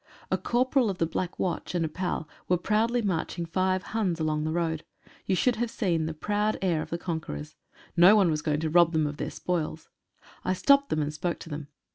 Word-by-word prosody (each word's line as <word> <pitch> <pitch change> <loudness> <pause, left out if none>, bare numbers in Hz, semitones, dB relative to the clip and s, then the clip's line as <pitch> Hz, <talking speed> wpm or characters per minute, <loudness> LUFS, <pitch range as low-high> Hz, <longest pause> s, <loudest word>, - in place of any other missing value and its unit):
A - - +3
corporal 255 0 +2
of 190 - -3
the 165 - +2
Black 175 +2 -3
Watch 180 0 -2
and 170 -2 +1
a - - 0
pal 165 0 -3 0.2
were 180 - +4
proudly 225 +6 +1
marching 175 -2 -1
five 185 +2 0
Huns 190 -7 0
along 155 -1 0
the 155 - -1
road. 160 -2 -1 0.4
You 190 - +2
should 245 +5 +2
have 240 0 -1
seen 170 -8 0
the 160 - -3
proud 210 +5 0
air 175 -5 +1
of - - -6
the 170 - -2
conquerors. 160 - -5 0.4
No 180 +5 +8
one 195 -6 +4
was 155 -1 -1
going 150 -1 0
to 160 - 0
rob 170 0 +5
them 155 -1 +2
of 145 0 -4
their - - -3
spoils. 160 -3 -3 0.5
I 185 - +1
stopped 280 +8 +4
them 155 - +1
and 145 +1 -3
spoke 170 +2 -2
to - - -9
them. 150 -1 -5
175 Hz, 220 wpm, -28 LUFS, 160-200 Hz, 0.5 s, No